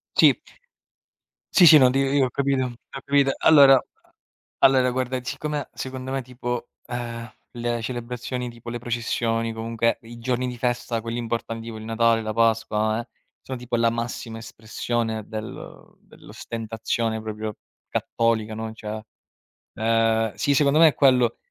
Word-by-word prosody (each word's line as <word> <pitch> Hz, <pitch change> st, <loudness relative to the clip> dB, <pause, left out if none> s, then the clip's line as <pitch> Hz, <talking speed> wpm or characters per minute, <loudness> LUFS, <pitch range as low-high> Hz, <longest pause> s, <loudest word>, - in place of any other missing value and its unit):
Sì. -, -, +6 dB, 1.1 s
Sì, 180 Hz, -, +7 dB
sì, 155 Hz, -2 st, +10 dB
no 130 Hz, -2 st, +6 dB
ti 135 Hz, -, 0 dB
io 135 Hz, 0 st, +2 dB
ho -, -, -5 dB
capito, 135 Hz, 0 st, 0 dB
ho 125 Hz, -, -4 dB, 0.3 s
capito. 140 Hz, -1 st, +3 dB
Allora 140 Hz, -3 st, +8 dB
a 130 Hz, -, -4 dB, 0.4 s
allora 130 Hz, -1 st, +5 dB
guarda, 130 Hz, 0 st, -1 dB
siccome 150 Hz, +2 st, -4 dB
secondo 130 Hz, 0 st, -6 dB
me 135 Hz, 0 st, -1 dB
tipo, 120 Hz, -1 st, -5 dB, 0.2 s
ehm, 120 Hz, -1 st, -5 dB, 0.3 s
le 120 Hz, -1 st, -2 dB
celebrazioni, 125 Hz, +1 st, -4 dB
tipo 120 Hz, 0 st, -9 dB
le 120 Hz, -, -4 dB
processioni, 115 Hz, -1 st, -1 dB
comunque 115 Hz, +1 st, -1 dB
i 115 Hz, +1 st, -11 dB
giorni 125 Hz, +1 st, -1 dB
di 125 Hz, -1 st, -5 dB
festa, 120 Hz, -1 st, -1 dB
quelli 115 Hz, +1 st, -4 dB
importanti, 115 Hz, -1 st, -4 dB
tipo 115 Hz, -1 st, -6 dB
il 110 Hz, -, -9 dB
Natale, 115 Hz, 0 st, +2 dB
la 110 Hz, 0 st, -3 dB
Pasqua, 110 Hz, -1 st, +1 dB
eh, 120 Hz, -, -10 dB, 0.3 s
sono 130 Hz, -1 st, -6 dB
tipo 125 Hz, 0 st, -6 dB
la 115 Hz, 0 st, +3 dB
massima 115 Hz, -1 st, -4 dB
espressione 110 Hz, 0 st, -3 dB
del 110 Hz, 0 st, -8 dB
dell'ostentazione 115 Hz, 0 st, -4 dB
proprio 110 Hz, -1 st, -5 dB, 0.3 s
cattolica, 110 Hz, -2 st, 0 dB
no, 110 Hz, 0 st, -5 dB
cioè, 110 Hz, 0 st, -6 dB, 0.8 s
ehm, 115 Hz, -1 st, +2 dB
sì, 145 Hz, -, +1 dB
secondo 145 Hz, +2 st, +4 dB
me 165 Hz, -, +9 dB
è 150 Hz, -, +2 dB
quello. 125 Hz, -4 st, +4 dB
120 Hz, 150 wpm, -24 LUFS, 115-130 Hz, 1.1 s, sì